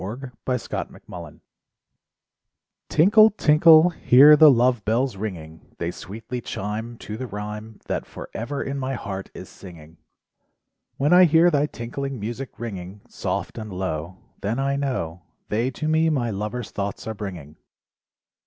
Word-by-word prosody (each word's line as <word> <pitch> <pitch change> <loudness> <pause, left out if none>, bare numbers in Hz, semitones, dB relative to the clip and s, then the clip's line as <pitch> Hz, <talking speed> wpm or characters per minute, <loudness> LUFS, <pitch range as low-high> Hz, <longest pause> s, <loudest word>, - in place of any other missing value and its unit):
LOVE 125 +7 -6
BELLS 125 -2 -2
Tinkle, - - -7 1.5
tinkle, 210 +7 +6
tinkle, 160 +2 +6
hear 145 0 +7
the 155 0 +8
Love 125 -3 +3
Bells 115 +2 0
ringing, 80 -7 -8
They 85 0 -3
sweetly 110 +7 -7
chime 110 +3 -5
To 105 -1 -7
the 130 +1 -5
rhyme 105 +1 -7
That - - -3
forever 135 +6 -6
ever - - -2
in 140 +1 -4
my 130 0 -2
heart 95 -4 -6
is - - -9
singing. 85 -3 -14 1.0
When 145 +5 +2
I 180 +1 +8
hear 165 +2 +5
thy 145 -1 +2
tinkling 135 +1 -5
music 120 +3 -6
ringing 100 -3 -7
Soft - - -4
and 110 -1 -7
low 90 -1 -4 0.2
Then 105 +4 -2
I 135 +1 0
know 120 - -3 0.3
They 115 +4 0
to 150 +4 -5
me 160 +1 +3
my 125 -7 0
lover's 105 +4 -4
thoughts 100 0 -4
are 110 - -3
bringing. 90 -8 -8
115 Hz, 145 wpm, -23 LUFS, 100-140 Hz, 1.5 s, the